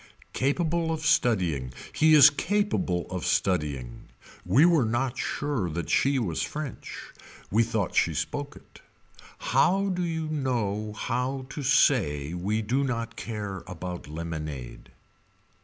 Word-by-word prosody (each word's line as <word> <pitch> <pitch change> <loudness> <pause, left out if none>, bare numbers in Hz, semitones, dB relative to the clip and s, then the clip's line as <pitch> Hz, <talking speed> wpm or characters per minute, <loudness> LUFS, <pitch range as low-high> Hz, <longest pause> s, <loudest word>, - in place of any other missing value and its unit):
Capable 165 +4 0
of 160 -1 -3
studying. 95 - +2 0.2
He 155 0 +5
is 150 0 +9
capable 170 - 0
of 90 -1 -3
studying. 75 -10 -1 0.4
We 145 +6 +5
were 170 -6 +4
not 120 +3 -1
sure 135 -13 -2
that 80 0 -4
she 140 0 +3
was 95 -11 -1
french. 150 -3 -6 0.4
We 110 +4 +4
thought 110 -4 -1
she - - +2
spoke 145 0 -3
it. - - -17 0.6
How 195 +2 +2
do 180 -1 -1
you 160 -2 -2
know 115 -8 -1
how 130 +4 -2
to 145 - -6
say 90 - +2
we 100 +5 -1
do 125 +6 +1
not 115 -3 -3
care 105 -5 -5
about 90 -2 -6
lemonade. 75 -5 -6
115 Hz, 130 wpm, -27 LUFS, 90-145 Hz, 0.6 s, is